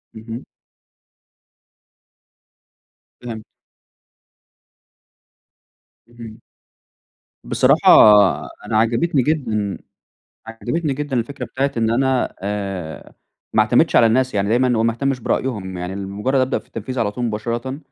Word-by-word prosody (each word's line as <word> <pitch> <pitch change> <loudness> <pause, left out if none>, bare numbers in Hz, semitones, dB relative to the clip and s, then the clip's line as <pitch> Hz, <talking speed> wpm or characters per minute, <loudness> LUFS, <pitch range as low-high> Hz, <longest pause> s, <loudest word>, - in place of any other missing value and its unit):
اهم. 115 +2 -8 2.8
فهمت. 115 -3 -7 2.7
اهم. 115 -1 -12 1.0
بصراحة - - +2 0.8
أنا 110 0 0
عجبتني 120 +7 +2
جدًا 110 -10 -1 0.7
عجبتني 135 +7 -3
جدًا 145 -1 -3
الفكرة 125 +3 -3
بتاعة 135 +4 -2
إن 115 -1 +1
أنا 130 +1 0
آآ 95 -5 -5 0.4
ما - - +4
اعتمدش - - +2
على 115 - +6
الناس، 130 +2 +1
يعني 100 0 0
دايمًا 125 +2 +2
أو 110 - +1
ما 115 0 +2
اهتمش 135 +1 -2
برأيهم، 100 -8 -3
يعني 90 +2 -5
لمجرّد 100 +7 -2
أبدأ 130 - 0
في - - -18
التنفيذ 120 +3 -6
على 105 -3 0
طول 125 - -4
مباشرةً، 120 +4 -3
115 Hz, 105 wpm, -20 LUFS, 105-130 Hz, 2.8 s, على